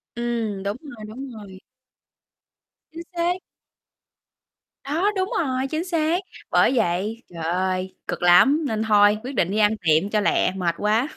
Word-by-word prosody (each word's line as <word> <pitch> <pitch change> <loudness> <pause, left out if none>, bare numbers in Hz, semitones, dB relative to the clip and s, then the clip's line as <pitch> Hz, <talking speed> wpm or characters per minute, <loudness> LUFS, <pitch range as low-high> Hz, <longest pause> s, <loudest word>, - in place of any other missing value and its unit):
Ừm, 230 -4 -2
đúng 200 +3 -2
rồi, 240 -8 -10
đúng 260 +6 -8
rồi. 200 -4 -11 1.3
Chính 330 +1 -8
xác. 350 +1 -1 1.4
Đó, 330 +9 0
đúng 380 0 -1
rồi, 265 -4 -1
chính 315 +1 -1
xác! 335 -1 0 0.3
Bởi - - +4
vậy, 210 +3 -1
trời 165 -1 -6
ơi, 185 +2 -1
cực - - -4
lắm, 270 - +5
nên 220 -3 -1
thôi, 210 -1 +5
quyết 260 +2 -6
định 180 -4 +1
đi 210 - -1
ăn 210 -1 +4
tiệm 160 +1 +2
cho 215 - +1
lẹ, 205 - +2
mệt 175 -3 -1
quá. 220 +5 +1
220 Hz, 155 wpm, -23 LUFS, 190-280 Hz, 1.4 s, lắm